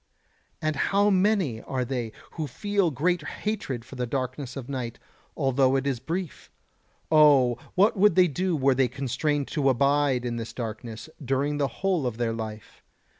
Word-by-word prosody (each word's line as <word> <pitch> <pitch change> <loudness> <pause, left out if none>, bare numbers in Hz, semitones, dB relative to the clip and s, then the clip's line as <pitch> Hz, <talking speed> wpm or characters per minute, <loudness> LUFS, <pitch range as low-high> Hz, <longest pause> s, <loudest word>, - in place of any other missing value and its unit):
And 155 -1 0
how 200 +8 +2
many 185 - +2
are 130 -2 -2
they 120 -3 -3 0.2
who 155 -3 -4
feel 200 - 0
great 170 +5 0
hatred 150 - -4
for - - -13
the 125 -1 -2
darkness 130 +1 -4
of 130 -3 -6
night, 125 -4 -4 0.4
although 135 -2 +3
it 135 0 0
is 135 -4 -1
brief. 165 +6 -5 0.6
Oh! 140 -6 +5 0.2
what 200 +5 +4
would 200 -3 +4
they 185 -1 +6
do 180 +3 -1
were 135 -1 +3
they 130 0 +2
constrained 140 +3 -1
to 140 -3 +1
abide 140 -1 +2
in 120 -1 -2
this 115 -1 -6
darkness 115 0 -6 0.2
during 140 +3 0
the 140 - +2
whole 180 -4 -1
of 115 -2 -4
their 120 -1 0
life? 110 -2 -7
135 Hz, 170 wpm, -26 LUFS, 125-160 Hz, 0.6 s, they